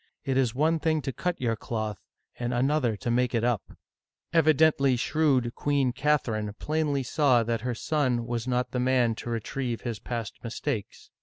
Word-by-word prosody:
It 135 Hz, -, 0 dB
is 125 Hz, -3 st, +1 dB
one 160 Hz, +4 st, +2 dB
thing 155 Hz, -2 st, +1 dB
to 135 Hz, 0 st, -3 dB
cut 180 Hz, +4 st, -2 dB
your 115 Hz, -3 st, 0 dB
cloth, 110 Hz, -3 st, -4 dB, 0.4 s
and 120 Hz, 0 st, -1 dB
another 130 Hz, -3 st, +1 dB
to 120 Hz, 0 st, -2 dB
make 125 Hz, 0 st, +1 dB
it 115 Hz, -, +1 dB
up! 120 Hz, -4 st, +1 dB, 0.4 s
" -, -, -52 dB
Evidently 155 Hz, -4 st, +4 dB
shrewd 130 Hz, -2 st, +1 dB
Queen 140 Hz, -3 st, +1 dB
Catherine 115 Hz, -8 st, 0 dB
plainly 150 Hz, -3 st, 0 dB
saw 130 Hz, -2 st, +3 dB
that 115 Hz, -1 st, -1 dB
her 125 Hz, 0 st, -2 dB
son 130 Hz, -4 st, 0 dB
was 120 Hz, 0 st, -3 dB
not 125 Hz, 0 st, 0 dB
the 125 Hz, -, -1 dB
man 125 Hz, -2 st, +3 dB
to 115 Hz, -, -7 dB
retrieve 120 Hz, +1 st, -3 dB
his 115 Hz, -3 st, -4 dB
past 115 Hz, -3 st, -5 dB
mistakes. 115 Hz, -1 st, -4 dB
125 Hz, 175 wpm, -27 LUFS, 115-145 Hz, 0.4 s, Evidently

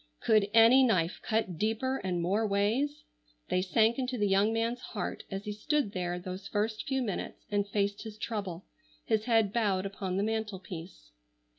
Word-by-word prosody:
Could 215 Hz, -2 st, +3 dB
any 230 Hz, +4 st, +7 dB
knife 185 Hz, -9 st, +2 dB
cut 210 Hz, -7 st, -1 dB
deeper 225 Hz, +5 st, 0 dB
and 180 Hz, -5 st, -2 dB
more 205 Hz, +5 st, +1 dB
ways? 230 Hz, +10 st, 0 dB, 0.5 s
They 185 Hz, -, +2 dB
sank 220 Hz, +6 st, +2 dB
into 255 Hz, -1 st, -2 dB
the 205 Hz, -2 st, +2 dB
young 200 Hz, +3 st, +3 dB
man's 230 Hz, +2 st, 0 dB
heart 210 Hz, -, -5 dB
as 195 Hz, 0 st, -4 dB
he 210 Hz, -, -3 dB
stood 270 Hz, +3 st, 0 dB
there 180 Hz, -2 st, -2 dB
those 185 Hz, +2 st, -6 dB
first 215 Hz, +1 st, -2 dB
few 265 Hz, -1 st, 0 dB
minutes 205 Hz, -6 st, -5 dB
and 205 Hz, 0 st, +1 dB
faced 200 Hz, 0 st, -1 dB
his 220 Hz, -2 st, -8 dB
trouble, 195 Hz, -6 st, -4 dB, 0.4 s
his 220 Hz, -1 st, +1 dB
head 225 Hz, -4 st, +3 dB
bowed 200 Hz, -5 st, +1 dB
upon 195 Hz, -2 st, -3 dB
the 200 Hz, -, +1 dB
mantel 220 Hz, -2 st, -2 dB
piece. 160 Hz, -, -10 dB
210 Hz, 175 wpm, -30 LUFS, 195-225 Hz, 0.5 s, any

